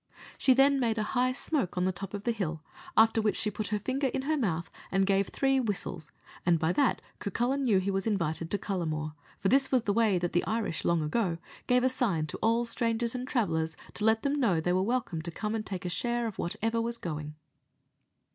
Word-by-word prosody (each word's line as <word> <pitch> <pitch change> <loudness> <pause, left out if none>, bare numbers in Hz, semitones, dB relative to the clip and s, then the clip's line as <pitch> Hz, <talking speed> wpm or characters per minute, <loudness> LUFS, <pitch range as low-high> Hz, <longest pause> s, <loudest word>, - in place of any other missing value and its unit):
She 260 - +5
then 275 +1 +5
made 230 -3 +1
a 215 - +1
high 255 0 +3
smoke 255 - -1
on 180 - +2
the 190 - +2
top 195 +2 -6
of 205 - -6
the 235 - +1
hill, 165 -8 -3 0.3
after 225 0 +5
which 215 -1 +1
she 215 -2 +1
put 210 +1 -3
her 210 - 0
finger 265 +6 -1
in 260 +1 -2
her 310 +3 +1
mouth, 175 - -1 0.2
and 195 0 +3
gave 195 0 +2
three 270 -1 +1
whistles, 205 - -3 0.3
and 175 -1 +4
by 160 +2 +1
that 280 +3 +2 0.2
Cucullin 245 +7 0
knew 215 -6 +4
he 190 +1 0
was 195 +2 -1
invited 165 -6 -1
to 205 - +1
Cullamore 155 -6 -3 0.3
for 195 - +1
this 270 +1 +3
was 255 -4 +3
the 205 - +1
way 220 -3 +3
that 175 0 -2
the 175 - +2
Irish 220 -6 -2
long 170 -2 +2
ago 170 +2 0 0.3
gave 250 0 +4
a - - +5
sign 220 -11 +1
to 155 - -5
all 230 +1 +2
strangers 230 0 0
and 250 0 -4
travellers, 160 - 0 0.2
to 210 - -4
let 220 0 +3
them 285 +1 +1
know 200 -11 +3
they 180 +2 0
were 185 - +2
welcome 210 -6 -1
to 170 - -5
come 210 +6 -3
and 220 -1 -3
take 185 -2 -4
share 240 +6 0
of 220 -4 -5
whatever 225 +6 -1
was 235 +1 -2
going. 150 -5 -5
210 Hz, 225 wpm, -29 LUFS, 175-240 Hz, 0.3 s, She